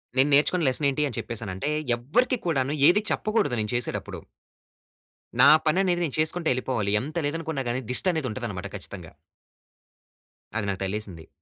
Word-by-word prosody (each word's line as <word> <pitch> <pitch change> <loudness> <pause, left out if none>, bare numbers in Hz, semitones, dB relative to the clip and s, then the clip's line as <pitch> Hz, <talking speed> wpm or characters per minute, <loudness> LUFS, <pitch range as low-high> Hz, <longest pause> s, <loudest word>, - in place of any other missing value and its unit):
నేను 135 +2 +4
నేర్చుకున్న 155 +4 +3
లెసన్ 140 +3 +2
ఏంటి 150 +2 0
అని 120 - -6
చెప్పేసనంటే, 110 +1 -4 0.3
ఎవ్వరికీ 240 - +1
కూడాను 140 -3 0
ఏది 210 +4 +3
చెప్పకూడదు 215 - 0
నేను 105 +2 -2
చేసేటప్పుడు. 120 -1 -3 1.2
నా 135 - +8 0.2
పననేది 175 +2 +2
నేను 140 - -3
చేసుకుంటా 160 +1 0
ఎళ్ళిపోవాలి. 120 -5 -2
ఎంత 150 +5 -7
లేదనుకున్నా 160 -3 -3
గాని 125 +2 -1
దిష్టనేది 160 -1 +2
ఉంటదనమాట 105 -5 -5
ఖచ్చితంగా. 90 -3 -9 1.4
అది 115 - -1
నాకు 95 -1 -3
తగిలేసింది. 95 -5 -5
130 Hz, 135 wpm, -25 LUFS, 110-160 Hz, 1.4 s, నా